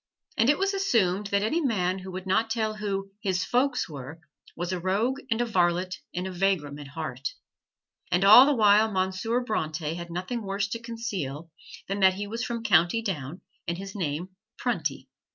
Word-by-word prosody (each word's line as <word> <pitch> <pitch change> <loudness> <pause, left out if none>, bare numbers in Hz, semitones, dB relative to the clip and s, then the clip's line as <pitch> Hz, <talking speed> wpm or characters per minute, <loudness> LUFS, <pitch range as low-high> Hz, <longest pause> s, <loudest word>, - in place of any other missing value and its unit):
And 225 - +3
it 290 - +4
was 390 +1 +1
assumed 210 - +1
that 200 0 +1
any 310 +11 +1
man 190 - 0
who 190 0 -8
would 185 +1 -6
not 220 +4 +2
tell 220 -1 0
who 195 -2 -3
"his 185 -3 0
folks" 250 +1 +1
were, 150 +1 -8 0.4
was 175 +2 -3
a 180 - -2
rogue 210 +9 0
and 225 -2 +1
a - - +2
varlet 180 -3 +1
and 180 +1 -3
a 190 - -4
vagrom 175 -6 0
at 145 - -8
heart. 140 -3 -5 0.8
And 180 +1 +3
all 220 +7 +10
the 290 - +3
while 215 -1 +5
Monsieur 190 +5 0
Bronte 155 -8 -2
had 170 0 -7
nothing 185 +8 -3
worse 195 0 -1
to 230 - -3
conceal 190 - -5 0.4
than 195 +1 -2
that 190 -1 +5
he 205 +1 -4
was 230 +4 -4
from 235 -2 -3
County 185 +2 +3
Down 165 - -4 0.3
and 170 0 -1
his 195 0 -7
name 170 -2 -3 0.3
Prunty. 160 - -2
195 Hz, 190 wpm, -27 LUFS, 175-225 Hz, 0.8 s, all